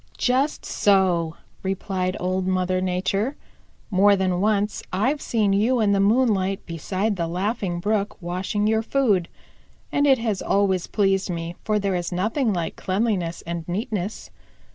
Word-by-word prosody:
"Just 265 +4 +1
so," 180 -5 +2 0.3
replied 190 -1 -2
Old 185 +1 -1
Mother 185 0 +1
Nature. 195 +7 -1 0.6
"More 200 +1 +5
than 185 -2 0
once 210 0 +1
I've 255 +11 0
seen 210 -4 +1
you 230 +6 +2
in 210 -2 +3
the 200 - +3
moonlight 200 -3 +2
beside 185 +5 -2
the 170 -1 -1
Laughing 185 0 -2
Brook 205 +2 -1
washing 185 +3 -2
your 220 +1 +2
food, 220 -8 +1 0.6
and 285 0 +2
it 270 -1 +6
has 220 -5 -2
always 190 -3 +1
pleased 195 -2 +1
me, 170 0 -4
for 215 -1 +1
there 200 -2 0
is 175 -1 -2
nothing 215 +7 0
like 170 -4 -3
cleanliness 185 -4 -1
and 170 0 -4
neatness. 200 +1 -3
195 Hz, 145 wpm, -23 LUFS, 180-215 Hz, 0.6 s, it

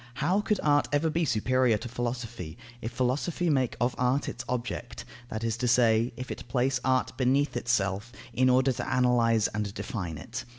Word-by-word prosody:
How 180 - +1
could 210 -1 0
art 145 -1 +3
ever 150 +2 +2
be 170 +1 +1
superior 125 -1 +2
to 120 - -7
philosophy, 120 -8 -4 0.2
if 115 - -4
philosophy 150 +8 0
make 130 -4 +1
of 120 +1 +1
art 125 +3 +1
its - - -5
object, 120 -1 -4 0.2
that 110 +1 -4
is 115 -1 -1
to 125 +1 -1
say, 115 -1 +4
if 125 +2 -6
it - - -7
place 130 0 +1
art 130 0 +1
beneath 135 +2 +2
itself, 115 -2 0 0.2
in 130 0 +3
order 130 +1 +4
to 125 - -2
analyse 115 -3 +3
and 105 -1 -3
define 90 -8 -4
it? 120 - -6
125 Hz, 180 wpm, -28 LUFS, 115-130 Hz, 0.2 s, say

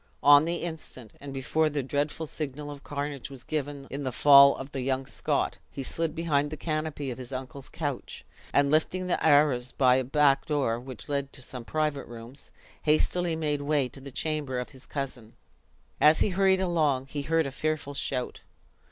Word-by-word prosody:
On 145 +1 +8
the 170 +1 -1
instant, 155 -9 -7
and 140 -1 -7
before 145 +4 0
the 145 -2 -2
dreadful 145 +4 -2
signal 150 -1 -5
of 140 -1 -10
carnage 145 -2 -4
was 135 -3 -10
given 145 -2 -4
in 140 +1 -4
the 130 - -2
fall 140 +2 +7
of 135 +1 -8
the 135 - -3
young 130 +1 -1
Scot, - - -1
he 135 - -6
slid 165 +4 0
behind 150 -3 +1
the 155 - -6
canopy 155 -3 -3
of 125 - -7
his 125 0 -8
uncle's 130 +1 -6
couch; 145 -5 -5 0.3
and 140 0 +3
lifting 175 +4 +1
the 180 - -1
arras 145 -5 +4
by 130 -1 +4
a 130 - +1
back 140 +2 +3
door 135 -7 0
which 130 -1 -10
led 140 -1 -2
to 130 - -8
some 125 -1 -7
private 150 -2 -1
rooms, 120 +4 -11 0.3
hastily 165 +2 +2
made 150 -2 -1
way 145 -2 +1
to 135 - -13
the 140 - -9
chamber 150 -2 -2
of 125 - -3
his 130 -2 -13
cousin. 130 -5 -5 0.7
As 155 +1 +5
he - - +3
hurried 190 0 +3
along, 155 -8 +1
he 145 +1 -5
heard 160 +2 +1
a 140 - -4
fearful 155 0 -2
shout. 130 -2 -3
145 Hz, 190 wpm, -28 LUFS, 135-155 Hz, 0.7 s, On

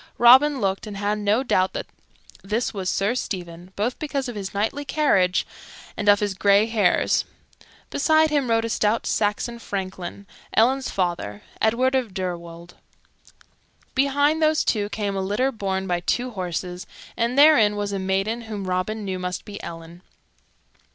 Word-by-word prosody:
Robin 265 +4 +6
looked, 195 0 -1
and 205 -2 -7
had 205 +1 -1
no 210 +5 +1
doubt 185 -7 +1
that - - -4 0.6
this 215 +6 -1
was 190 -3 -3
Sir 200 +4 +1
Stephen, 180 -6 -5
both 230 +5 -2
because 280 -3 -2
of 245 - -6
his 195 -2 -5
knightly 220 +8 -2
carriage 195 -12 +2 0.5
and 205 - 0
of 205 0 +5
his 205 -1 0
gray 200 +2 +4
hairs. 220 -5 +2 0.7
Beside 315 +1 +3
him 280 -5 +1
rode 225 0 +2
a - - -3
stout 215 +1 0
Saxon 220 +3 -1
franklin, 190 -2 -6 0.3
Ellen's 260 +4 +3
father, 170 - -2 0.2
Edward 245 +4 +2
of 245 -7 -1
Deirwold; 170 -2 -6 1.2
behind 285 +3 +2
those 310 0 +3
two 205 -2 0
came 205 -2 -3
a 195 - -1
litter 210 +8 0
borne 190 -5 -3
by 175 -2 0
two 245 +8 -1
horses, 180 -2 -5 0.3
and 235 +2 -1
therein 280 -9 +6
was 205 0 -2
a 200 - -2
maiden 195 +5 -1
whom 205 -2 -4
Robin 185 +4 -2
knew 190 -1 -3
must 180 0 -4
be 205 -1 -8
Ellen. 165 +1 -9
205 Hz, 160 wpm, -23 LUFS, 190-245 Hz, 1.2 s, Robin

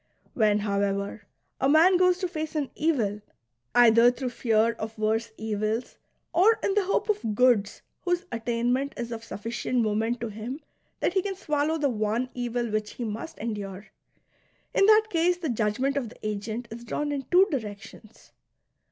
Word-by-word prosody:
When, 210 -3 +3
however, 200 0 -2 0.3
a 270 - +2
man 330 +5 +6
goes 365 0 +4
to 365 0 -2
face 315 -3 -5
an 290 -3 -1
evil, 230 -10 0 0.5
either 235 0 +7
through 250 0 -3
fear 230 -1 +2
of 220 -1 -7
worse 220 +2 0
evils 220 +2 -2 0.3
or 425 +6 +5
in 390 - +1
the 410 -1 +2
hope 395 - 0
of 240 - -1
goods 230 -4 +2 0.2
whose 355 0 -1
attainment 240 +4 -1
is 235 0 -4
of 225 -1 -5
suffi 230 0 -7
cient 240 0 0
moment 220 +3 0
to 235 - -3
him 220 +7 -6 0.4
that - - +1
he 380 - +2
can 390 0 -3
swallow 305 -3 0
the 290 -3 +1
one 225 +2 -1
evil 245 -1 -2
which 215 0 -2
he 245 - -5
must 225 +8 -5
endure, 205 -3 -5 0.4
— - - -39
in 390 - +4
that 435 0 +6
case 345 +1 +2
the 335 -4 -3
judgment 235 +4 0
of 260 -5 -2
the 215 - -8
agent 215 +3 -4
is 235 +1 -8
drawn 290 +5 -2
in 275 -2 -4
two 365 +2 +6
directions. 215 -3 -7
235 Hz, 175 wpm, -27 LUFS, 215-300 Hz, 0.5 s, either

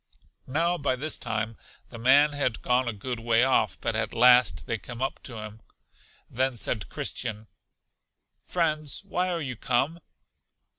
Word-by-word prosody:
Now, 170 +6 0
by 140 -3 0
this 150 +4 -2
time, 110 -3 -3 0.3
the 115 - -9
man 140 +5 +5
had 140 -6 -1
gone 125 0 +2
a - - 0
good 120 +4 -5
way 115 +1 +3
off, 130 0 +2
but - - -2
at - - -2
last 125 0 +5
they 115 -3 -2
came 120 +2 -9
up 135 +1 -3
to 120 -4 -8
him. 110 0 -8 0.7
Then 130 +1 0
said 105 -2 -2
Christian, 110 0 -3 1.0
Friends, 155 -2 -1
why 185 -2 -1
are 175 -2 -1
you 130 -4 -4
come? 135 +9 0
125 Hz, 155 wpm, -27 LUFS, 115-145 Hz, 1.0 s, man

